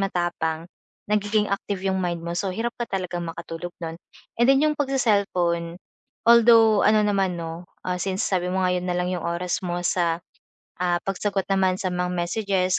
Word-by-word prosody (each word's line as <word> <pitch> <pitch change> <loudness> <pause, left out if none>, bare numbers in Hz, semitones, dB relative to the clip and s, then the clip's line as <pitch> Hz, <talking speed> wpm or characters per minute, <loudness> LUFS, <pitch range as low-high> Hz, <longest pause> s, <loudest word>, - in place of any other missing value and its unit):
matapang 175 -3 -1 0.4
nagiging 210 0 +1
active 200 -1 -2
'yong 190 0 +1
mind 175 -2 -2
mo 170 - -4
so 195 - -1
hirap 235 +3 -1
ka 240 - -2
talagang 180 -2 -3
makatulog 165 +1 -6
non 165 0 -4 0.4
and 240 - +5
then 270 0 +6
'yong 305 -1 +2
pagse-cellphone 200 -11 +1 0.5
although 230 -2 +7
ano 215 0 +5
naman 195 -3 +1
'no, 165 +1 -6 0.2
ah, 180 0 -1
since 190 0 -1
sabi 180 -2 0
mo 190 0 0
nga 180 - +2
'yon 180 0 -3
na 180 - 0
lang 180 0 0
'yong 175 - -3
oras 175 +3 -1
mo 175 0 -2
sa, 170 -2 +1 0.6
ah, 175 -1 +2
pagsagot 195 0 -1
naman 190 -1 +2
sa 185 - 0
mga 180 0 -1
messages, 185 +1 0
185 Hz, 180 wpm, -24 LUFS, 175-205 Hz, 0.6 s, although